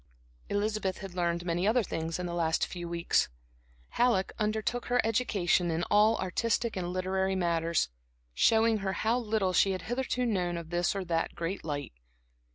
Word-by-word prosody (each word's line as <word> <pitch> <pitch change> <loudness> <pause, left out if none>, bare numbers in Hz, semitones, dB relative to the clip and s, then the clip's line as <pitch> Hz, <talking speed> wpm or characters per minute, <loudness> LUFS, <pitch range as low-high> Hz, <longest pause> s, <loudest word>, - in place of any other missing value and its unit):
Elizabeth 205 -2 -1
had 195 -2 -8
learned 170 -1 -1
many 175 +2 0
other 230 +2 +3
things 165 -3 -3
in 180 - -4
the 175 - -4
last 165 -2 +1
few 175 -2 -6
weeks. 170 0 +1 0.6
Halleck 235 -6 +1
undertook 220 +3 -1
her 245 0 +2
education 205 -6 +1
in 165 +1 -1
all 215 +2 +5
artistic 225 +5 -1
and 180 -2 -3
literary 190 +1 0
matters, 170 -2 +1 0.5
showing 225 - +4
her 195 -1 -2
how 230 +5 +1
little 215 -5 0
she 195 +2 +4
had 185 - -5
hitherto 250 +1 -1
known 180 -6 0
of 170 -1 -8
this 175 +2 +1
or 195 -1 -3
that 165 -1 -1
great 170 +4 -3
light. 145 - -4
190 Hz, 165 wpm, -30 LUFS, 170-220 Hz, 0.6 s, all